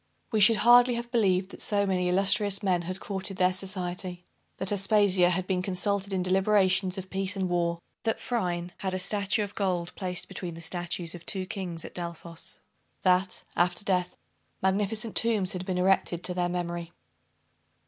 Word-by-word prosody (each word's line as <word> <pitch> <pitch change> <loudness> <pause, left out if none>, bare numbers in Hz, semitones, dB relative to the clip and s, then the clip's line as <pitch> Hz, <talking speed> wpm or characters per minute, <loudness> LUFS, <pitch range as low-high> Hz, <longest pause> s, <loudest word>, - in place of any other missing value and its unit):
We 220 - +2
should 210 +3 +7
hardly 245 0 +7
have 235 0 -5
believed 190 -5 +2
that - - -9
so 200 -1 +1
many 180 -2 0
illustrious 195 +2 +3
men 180 -3 +2
had 185 +2 -5
courted 195 -1 -4
their 185 0 +3
society 180 -1 -4 0.3
that 190 - +1
Aspasia 195 -3 +3
had 180 +1 -1
been 185 -1 0
consulted 200 +2 -1
in 185 -1 0
deliberations 190 0 +2
of 190 0 -7
peace 195 +1 0
and 190 -1 -1
war 170 -1 0 0.2
that 225 - -1
Phryne 180 -7 -2
had 190 -1 -2
a - - 0
statue 200 +2 +1
of 205 0 -6
gold 180 -3 -1
placed 180 -2 -3
between 175 -3 -6
the - - -9
statues 175 0 -2
of 175 -1 -10
two 190 -2 0
kings 180 -4 -5
at - - -9
Delphos 170 -1 -5 0.5
that, 185 +1 +2
after 175 +3 +1
death, 180 -2 0 0.4
magnificent 210 +4 0
tombs 215 -5 +2
had 185 0 -5
been 185 -1 -1
erected 180 -2 +1
to 180 - +1
their 175 0 0
memory. 175 -1 -4
185 Hz, 175 wpm, -28 LUFS, 180-200 Hz, 0.5 s, should